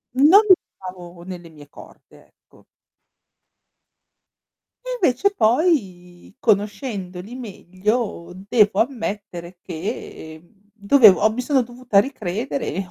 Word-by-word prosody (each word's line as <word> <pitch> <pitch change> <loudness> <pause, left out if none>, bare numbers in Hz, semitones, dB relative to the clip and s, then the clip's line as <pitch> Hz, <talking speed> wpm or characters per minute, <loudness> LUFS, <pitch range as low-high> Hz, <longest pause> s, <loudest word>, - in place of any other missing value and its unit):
Non 305 +10 +7
li 385 -3 +7 0.2
trovavo 180 -2 -10
nelle 175 -2 -9
mie 150 -2 -16
corde, - - -17
ecco. - - -26 2.2
E - - -6
invece 350 +7 +2
poi 215 - -1
conoscendoli 205 -2 -2
meglio, 205 -4 -4
devo 205 +2 +1
ammettere 205 -8 -5
che, 160 -3 -7
mhmm, 170 - -26 0.2
dovevo 215 -1 +5
ho 215 - +3
mi 235 +3 -4
sono 265 +1 +1
dovuta 240 -3 0
ricredere 235 +2 -3
e 190 0 -4
205 Hz, 105 wpm, -21 LUFS, 180-250 Hz, 2.2 s, Non